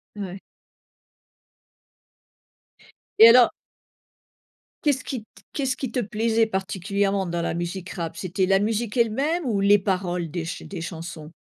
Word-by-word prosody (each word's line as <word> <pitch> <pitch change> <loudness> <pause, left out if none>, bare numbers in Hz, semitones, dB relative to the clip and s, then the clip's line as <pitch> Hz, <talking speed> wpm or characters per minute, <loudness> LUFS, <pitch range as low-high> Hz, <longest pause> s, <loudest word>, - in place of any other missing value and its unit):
Ouais. 195 -2 -6 2.8
Et 225 - +11
alors 245 +1 +7 1.3
qu'est-ce 280 -4 +1
qui 245 -5 -5
t - - -32 0.3
qu'est-ce 265 -3 -1
qui 260 -4 -4
te 250 - -1
plaisait 225 +1 +1
particulièrement 195 0 -1
dans 170 -1 -2
la 170 - -1
musique 175 +2 -4
rap? 165 -2 -5
C'était 185 +1 -1
la 195 +1 +3
musique 220 +1 -1
elle-même 275 +9 +1
ou 215 -6 0
les 205 +1 +5
paroles 180 -3 -2
des 165 +1 -4
ch 165 - -6
des 185 -4 -6
chansons? 165 -2 -7
200 Hz, 135 wpm, -24 LUFS, 180-230 Hz, 2.8 s, Et